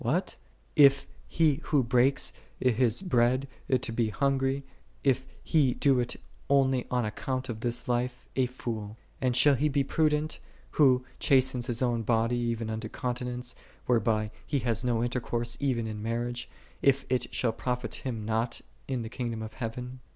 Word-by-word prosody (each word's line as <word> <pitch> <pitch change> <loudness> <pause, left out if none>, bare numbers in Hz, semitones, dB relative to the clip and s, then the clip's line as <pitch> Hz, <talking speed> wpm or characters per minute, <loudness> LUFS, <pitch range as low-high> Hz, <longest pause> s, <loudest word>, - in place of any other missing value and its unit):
s - - -8
What? 155 +11 0 0.4
is 140 -2 +6 0.2
he 155 -4 +2
who 145 -4 +3
breaks 125 +3 +3 0.3
his 125 - +2
bread 130 -4 +2 0.2
to 130 -3 +1
the 115 -1 +1
hungry, 135 +4 0 0.4
if 130 -1 +2 0.2
he 140 -6 +3
do 135 -3 +3
it 120 0 -1 0.3
only 135 -2 +3
on 125 -2 +1
account 130 +4 -3
of 110 -2 -4
this 120 +1 -2
life, 125 +1 -1
a 130 -1 +2
fool; 110 -4 -5 0.2
and 125 -2 +1
shall 145 +3 +6
he 145 +3 +2
be 140 -1 +2
prudent, 155 +1 +1 0.3
who 130 -4 +4
chastens 130 -2 +3
his 120 0 0
own 120 -2 +1
body 115 +1 +1
even 115 -2 -1
unto 110 0 -4
continence, 125 0 -3 0.3
whereby 110 -3 +1
he 145 - -1
hath 120 -2 0
no 120 -2 +1
inter 120 +1 0
course 120 0 -2
even 130 -5 0
in 110 -1 -5
marriage, 120 +2 -2 0.3
if 140 0 +3
it 130 -1 -1
shall 120 - +1
profit 125 +1 -3
him 115 -5 -3
nought 115 +2 -1 0.3
in 130 -3 -2
the - - -5
kingdom 115 -1 -4
of 110 0 -7
heaven 125 +2 -5
125 Hz, 165 wpm, -29 LUFS, 115-135 Hz, 0.4 s, is